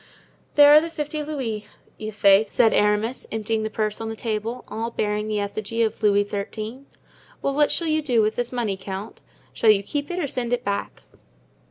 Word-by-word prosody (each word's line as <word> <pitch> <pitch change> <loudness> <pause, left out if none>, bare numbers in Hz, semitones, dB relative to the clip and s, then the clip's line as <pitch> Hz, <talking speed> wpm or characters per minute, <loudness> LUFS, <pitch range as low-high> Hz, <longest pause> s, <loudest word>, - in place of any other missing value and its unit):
"There 290 0 +8
are 305 - +8
the 330 - -4
fifty 305 -1 -4
louis, 250 -9 -4 0.3
i'faith," 210 -1 +3
said 225 - +4
Aramis, 210 +4 +1
emptying 220 0 -1
the 215 - -2
purse 215 0 -2
on 225 - -3
the 225 - -5
table, 225 +2 -3
all 225 +2 -3
bearing 210 -2 -2
the 215 -1 -1
effigy 215 +3 -2
of 220 0 -2
Louis 205 -1 +3
XIII. 215 +5 -5 0.6
"Well, 275 - 0
what 295 +1 +3
shall 340 - +1
you 310 -1 +1
do 250 -6 +1
with 215 +1 +1
this 245 -1 -2
money, 230 -6 -1
count? 195 +2 -7 0.3
Shall 225 - +2
you 200 -2 +5
keep 285 +7 -3
it 355 - -3
or 355 - 0
send 250 -3 -3
it 245 0 -1
back?" 200 0 -3
220 Hz, 195 wpm, -23 LUFS, 210-255 Hz, 0.6 s, There